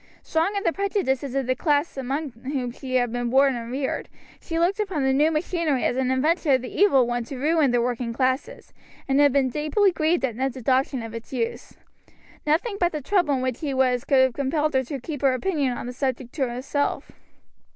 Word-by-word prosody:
Strong 330 +6 0
in 400 - -1
the 340 - +1
prejudices 285 - -1
of 270 -1 0
the 255 - +1
class 290 +3 0
among 275 +2 -3
whom 250 +1 -4
she 255 +1 -5
had 245 -2 +2
been 245 0 -2
born 270 +2 +4
and 235 0 -6
reared, 265 +1 -3 0.3
she 330 - -4
looked 355 +5 +1
upon 375 -9 -1
the 265 0 +2
new 295 +4 +4
machinery 320 -3 0
as 245 - +1
an 260 -1 0
invention 300 +3 +2
of 260 -1 +2
the 250 - -7
evil 280 -11 +5
one 240 0 -2
to 260 +3 -8
ruin 305 +1 +2
the 245 0 +2
working 240 0 -1
classes, 260 +3 -2 0.3
and 270 +1 +2
had 290 -1 +6
been 270 -1 +2
deeply 310 - +2
grieved 320 -2 +1
at 240 -4 -4
Ned's 265 +1 -2
adoption 260 0 0
of 225 0 -7
its 230 0 -8
use. 235 -3 -4 0.7
Nothing 400 +8 +1
but 350 -1 +2
the 305 - -3
trouble 350 -2 +2
in 255 - -2
which 255 -2 -2
he 285 -4 -3
was 255 -2 +2
could 270 -2 +4
have 260 -2 +1
compelled 295 +4 0
her 265 0 +2
to 275 +2 -5
keep 290 +2 -6
her 270 -2 +3
opinion 275 -5 -1
on - - -6
the 245 - -5
subject 260 -1 -3
to 270 -5 -1
herself. 270 +4 -2
270 Hz, 220 wpm, -24 LUFS, 255-310 Hz, 0.7 s, had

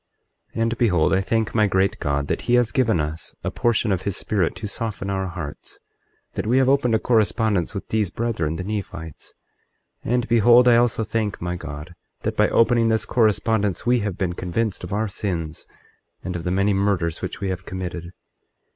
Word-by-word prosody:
24:8 115 - -1
And 115 0 -1
behold, 90 -10 +3
I 95 - +3
thank 110 +2 -1
my 110 -2 +3
great 95 0 +1
God 70 -2 -1
that - - -1
he 120 - +5
has 120 -4 +3
given 115 -7 +2
us 75 +2 -4
a - - -2
portion 120 -2 +1
of 95 -2 0
his 100 0 -2
Spirit 95 -6 0
to 110 - -5
soften 105 -2 -3
our 95 -1 -1
hearts, 85 -5 -8 0.6
that - - -3
we 125 +3 +3
have 130 -1 +4
opened 135 -4 +3
a - - +2
correspondence 110 -5 +1
with 100 - -5
these 110 -4 +1
brethren, 95 -8 -2
the 90 - -4
Nephites. 90 -6 -6 0.7
24:9 - - -3
And 125 -1 +1
behold, 120 +2 +6
I 120 - +7
also 120 -1 +2
thank 110 -2 -2
my 90 0 -3
God, 75 0 -8 0.3
that - - -1
by - - +3
opening 115 0 +3
this 110 -1 +1
correspondence 110 -3 +1
we 120 0 +3
have 100 -4 -3
been 90 -2 -1
convinced 95 +4 -2
of 90 - -6
our 110 +2 0
sins, 85 -5 -4 0.6
and 90 - -4
of 85 - -5
the - - 0
many 100 +2 +2
murders 95 -5 0
which - - -5
we 100 - -2
have 90 -1 -5
committed. 90 -2 -5
100 Hz, 200 wpm, -23 LUFS, 90-115 Hz, 0.7 s, I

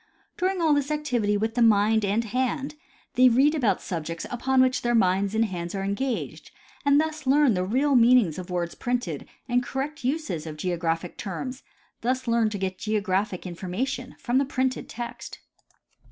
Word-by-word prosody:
During 370 0 0
all 315 -2 +4
this 285 -1 0
activity 250 -9 0
with 220 +2 -1
the 245 - 0
mind 220 0 +4
and 205 +3 +1
hand 255 +5 -2 0.4
they 255 0 +6
read 270 +6 +4
about 250 -10 +2
the - - -16
subjects 165 -1 -4
upon 260 +2 +1
which 255 0 +3
their 240 0 +1
minds 195 0 +2
and 225 +1 +3
hands 175 -3 -5
are 195 - -2
engaged 230 +6 -3 0.3
and 285 0 +5
thus 310 -2 -2
learn 280 -2 +5
the 180 -1 0
real 265 +9 +1
meanings 235 -8 +5
of 180 - -8
words 175 -1 -2
and 245 0 +1
the 245 - -3
correct 270 +4 -4
uses 255 - -2
of 155 -1 -7
geographic 170 0 -2
terms, 255 - -5 0.4
thus 255 +2 -1
learn 230 -1 +3
to 210 - -4
get 190 -1 -3
geographic 205 -3 -1
information 190 +9 -4
from 250 +1 +1
the 275 - +1
printed 260 -1 -2
text. 240 0 -7
230 Hz, 175 wpm, -26 LUFS, 190-260 Hz, 0.4 s, they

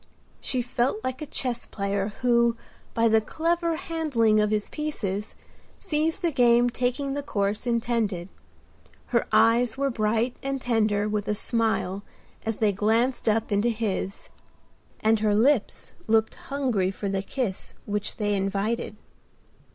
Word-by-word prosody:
She 255 -2 -1
felt 245 - 0
like 260 +2 -3
a 305 - -4
chess 245 -3 -2
player 200 -1 -1 0.2
who, 235 -1 +3 0.4
by 230 0 +4
the 220 0 +4
clever 335 +7 0
handling 310 - +1
of 210 0 +2
his 210 -1 0
pieces, 210 -10 -3 0.4
sees 320 -3 0
the 340 - +1
game 240 -2 +4
taking 255 +3 -1
the 285 - -2
course 205 -3 -1
intended. 225 -6 0 0.8
Her 235 - +2
eyes 230 +2 +4
were 275 0 +1
bright 225 +2 0
and 275 0 -2
tender 215 -4 +1
with 210 -1 -2
a 210 - +1
smile 220 -3 0 0.5
as 225 - -1
they 215 -2 +3
glanced 225 +5 +1
up 220 +1 0
into 205 +4 +2
his; 210 -4 -3 0.7
and 220 0 +3
her 210 -1 +2
lips 240 +1 +2
looked 220 0 +3 0.2
hungry 255 -10 +1
for 195 +1 -4
the 195 0 0
kiss 200 -1 -3
which 205 0 -3
they 205 -1 0
invited. 200 +3 -1
230 Hz, 145 wpm, -26 LUFS, 210-255 Hz, 0.8 s, by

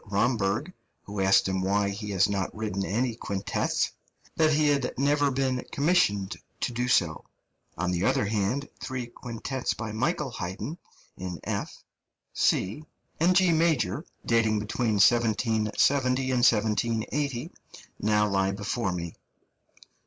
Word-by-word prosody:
Romberg, 105 - 0 0.3
who 100 0 -6
asked 95 0 +4
him 95 0 -1
why 100 +1 +1
he 105 +1 -5
has 95 -1 +3
not 100 -2 -2
written 105 -3 -2
any 115 +5 0
quintets, 100 -4 -1 0.4
that 155 -1 +4
he 150 0 +3
had 140 -3 0
never 145 +1 +3
been 130 -1 0
commissioned 140 - +2 0.3
to - - 0
do 125 +1 -1
so; 85 -10 +2 0.5
on 90 +2 -1
the 90 0 -1
other 105 - +2
hand, 110 +7 -1
three 130 -2 -4
quintets 120 +2 -4
by 115 -2 -5
Michael 135 +5 -1
Haydn 110 - -5 0.4
in 90 -2 -5
F, - - -4 0.5
C, 105 +11 +1 0.4
and 175 +3 +4
G 185 -1 +5
major, 155 - +1 0.2
dating 110 -2 +2
between 110 +2 -1
1770 120 +4 +3
and 130 - -1
1780, 120 +5 +1 0.5
now 105 0 +2
lie 95 -1 +1
before 100 +1 -2
me. 85 -2 -4
110 Hz, 130 wpm, -27 LUFS, 100-130 Hz, 0.5 s, G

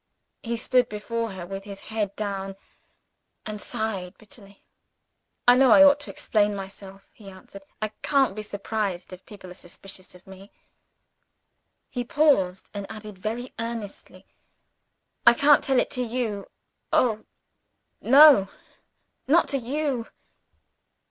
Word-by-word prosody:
He 235 0 -3
stood 250 +1 +2
before 225 +1 -4
her, 185 -2 -7
with 195 +2 -7
his 200 -1 -9
head 210 -3 -4
down, 195 -2 -4 0.9
and 210 -1 -6
sighed 210 -6 -4
bitterly. 205 -2 -14 0.8
"I 245 - +9
know 260 0 +5
I 285 +5 +8
ought 285 0 +6
to 290 - -10
explain 210 -1 0
myself," 195 0 -10
he 205 -3 -13
answered. 195 +1 -13 0.2
"I 215 - -1
can't 270 -8 +2
be 215 - -5
surprised 200 -3 -4
if 185 - -13
people 195 -3 -12
are - - -8
suspicious 185 +1 -13
of 180 - -18
me." 190 +1 -14 1.4
He 245 - -4
paused, 235 -10 +1
and 200 -1 -6
added 210 -3 -10
very 230 +5 -5
earnestly, 230 -3 -7 1.0
"I 235 - +8
can't 285 +3 +5
tell 265 -2 +2
it - - -1
to 250 - -2
you. 230 -4 -3 0.4
Oh, 220 -3 +1 0.8
no 275 -7 +7 0.8
not 330 +5 +4
to 275 - -1
_you! 260 -1 -3
215 Hz, 135 wpm, -25 LUFS, 195-245 Hz, 1.4 s, I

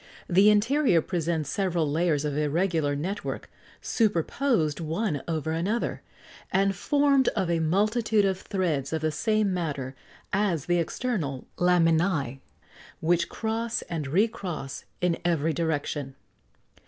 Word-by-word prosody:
The 195 +4 +5
interior 230 - +4
presents 165 -2 -2
several 175 -6 0
layers 155 -1 +1
of 145 -2 -2
irregular 150 0 +1
net 185 +8 -3
work, - - -5 0.3
superposed 205 - +1
one 165 -1 -1
over 160 -1 -2
another, 190 +9 -1 0.5
and 195 0 +2
formed 280 +4 +3
of 175 -2 0
a 165 - +1
multitude 210 +6 +2
of 190 -1 0
threads 160 -8 -1
of 160 -1 -2
the 155 - +1
same 215 +4 +1
matter 145 -7 -3 0.4
as 190 -7 +1
the 175 0 +2
external 165 - -2
laminæ, 170 -2 +3
and 135 +3 -10 0.6
which 170 +1 +1
cross 225 +1 -2
and 160 -5 -4
re 190 +11 +3
cross 170 -10 -6 0.2
in 175 -2 +1
every 165 -2 +1
direction. 145 -4 -2
170 Hz, 130 wpm, -27 LUFS, 155-205 Hz, 0.6 s, The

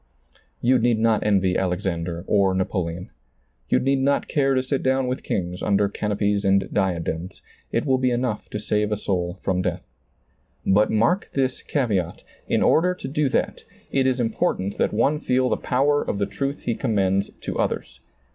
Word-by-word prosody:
You 125 +1 +4
need 120 -1 +2
not 110 -1 +2
envy 95 -3 +2
Alexander 90 -2 -2
or 100 -2 +2
Napoleon. 90 -2 -2 0.6
You - - +4
need 135 +1 +1
not 140 +1 +1
care 135 -2 +2
to 130 - +1
sit 135 +1 -1
down 130 0 +1
with 125 +1 -2
kings 90 -1 -3
under 100 0 +2
canopies 105 0 -1
and 95 -1 +3
diadems 85 -1 -2
— - - -36
it - - 0
will 130 -2 +2
be 130 0 +2
enough 120 -3 -2
to 105 - -4
save 105 0 0
a 105 - +1
soul 90 -3 -2
from 90 -2 0
death. - - -2 0.8
But 105 +3 +4
mark 165 - +1
this 130 -2 0
caveat, 105 - -1
— - - -34
in - - +2
order 180 +3 +3
to - - -7
do 145 0 0
that, - - -1 0.3
it 135 -1 +2
is 130 -1 +1
important 100 -4 -1
that - - +2
one 140 +8 +2
feel 130 -3 +1
the 110 - +2
power 145 +3 +1
of - - -2
the 100 - +1
truth 135 +9 -3
he 120 - -1
commends 100 -3 0
to - - -4
others. - - -2
105 Hz, 185 wpm, -23 LUFS, 95-130 Hz, 0.8 s, You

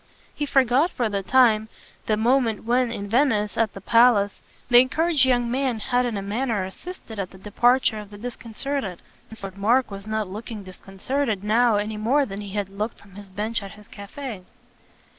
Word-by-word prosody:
He 295 - -3
forgot 270 +4 +3
for 240 -9 -1
the 200 -1 -1
time 220 -1 +3 0.4
the 215 - +2
moment 230 -1 +1
when, 245 +1 +1
in 200 -3 -5
Venice, 220 -3 +1
at 225 -2 +1
the 195 - -8
palace, 230 -2 +4 0.3
the 240 -1 +7
encouraged 290 +3 +3
young 245 -2 +1
man 260 -2 0
had 245 +3 0
in 225 -4 -3
a 195 - -4
manner 215 0 -1
assisted 225 - -9
at 190 -2 -3
the 190 - -15
departure 225 +3 +2
of 210 -1 -10
the 205 - -11
disconcerted, 235 -2 -4 0.3
since 220 -2 -11
Lord 195 0 -7
Mark 240 +4 +2
was 200 +1 -8
not 215 -1 -1
looking 210 +2 -7
disconcerted 195 +4 -3
now 225 +2 +3
any 210 +1 -2
more 260 +7 +2
than 200 -2 -7
he 205 - -7
had 205 -2 -2
looked 210 +3 -4
from 200 -1 -19
his 200 0 -11
bench 215 +4 -3
at 200 -1 -9
his 210 -1 -16
cafe. 215 +1 -8
220 Hz, 190 wpm, -24 LUFS, 205-250 Hz, 0.4 s, the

